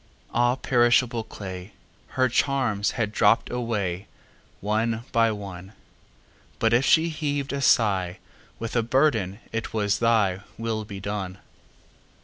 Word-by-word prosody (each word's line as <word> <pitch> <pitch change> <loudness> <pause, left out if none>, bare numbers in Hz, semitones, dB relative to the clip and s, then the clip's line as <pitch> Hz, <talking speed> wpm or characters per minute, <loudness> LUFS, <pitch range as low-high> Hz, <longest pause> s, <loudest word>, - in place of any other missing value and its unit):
Ah, 120 +1 +3
perishable 120 -2 +2
clay! 95 -2 -8 0.4
Her 130 0 +4
charms 120 -5 +1
had 110 -3 -1
dropp'd 115 +2 +3
awayOne 105 -6 -2 1.0
by 115 -1 +3
one; 100 -2 -8 0.8
But 115 0 +2
if 120 +3 +4
she 165 +4 +4
heav'd 145 -2 -2
a 140 - -2
sighWith 105 -1 0
a 120 - +4
burden, 115 -5 +1
it 115 0 -4
was, 105 -1 +1
"ThyWill 110 0 0
be 100 -2 -7
done." 95 -1 -4
115 Hz, 115 wpm, -25 LUFS, 100-120 Hz, 1.0 s, Her